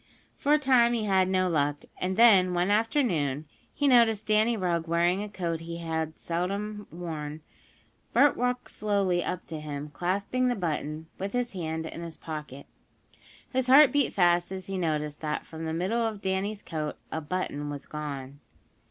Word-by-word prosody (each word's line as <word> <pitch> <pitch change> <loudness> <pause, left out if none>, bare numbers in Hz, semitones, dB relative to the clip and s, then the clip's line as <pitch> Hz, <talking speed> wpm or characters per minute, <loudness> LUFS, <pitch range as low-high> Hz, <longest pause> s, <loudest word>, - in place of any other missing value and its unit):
For 285 - -1
a - - +7
time 255 -5 +4
he 230 -2 0
had 190 -2 +3
no 185 -1 +2
luck, 145 -3 0
and 185 +1 -2
then, 195 -6 +6
one 175 +3 +1
afternoon, 205 - +1
as - - -33 0.2
he 290 - +1
noticed 230 -5 +4
Danny 215 +2 +3
Rugg 170 -3 -1
wearing 170 +3 +2
a 210 - -5
coat 170 -5 -3
he 170 +1 -6 0.4
seldom 200 +5 -3
had 175 +1 -8
on, 150 -1 -5 0.7
Bert 285 -2 +5
walked 250 0 -1
slowly 200 -4 +1
up 180 0 -4
to 160 -2 -6
him, 150 -1 -6
clasping 200 +10 0
the 245 - +1
button, 155 -4 -3
with 195 +1 -4
his 245 -2 -1
hand, 160 -3 -3
in 165 - -7
his 165 -1 -7
pocket. 150 -3 -7 0.9
His 260 0 +1
heart 270 +1 +8
beat 285 -2 +2
fast 175 -1 +3
as 190 -1 -5
he 195 - -4
noticed 150 -4 -2
that 150 -1 -2
from 160 0 -7
the 160 - -2
middle 190 +8 0
of 220 -3 -1
Danny's 195 +2 -2
coat 155 -2 -4
a 160 - -2
button 150 -3 -3
was 145 -1 -6
gone. 140 -2 -6
180 Hz, 180 wpm, -28 LUFS, 160-215 Hz, 0.9 s, heart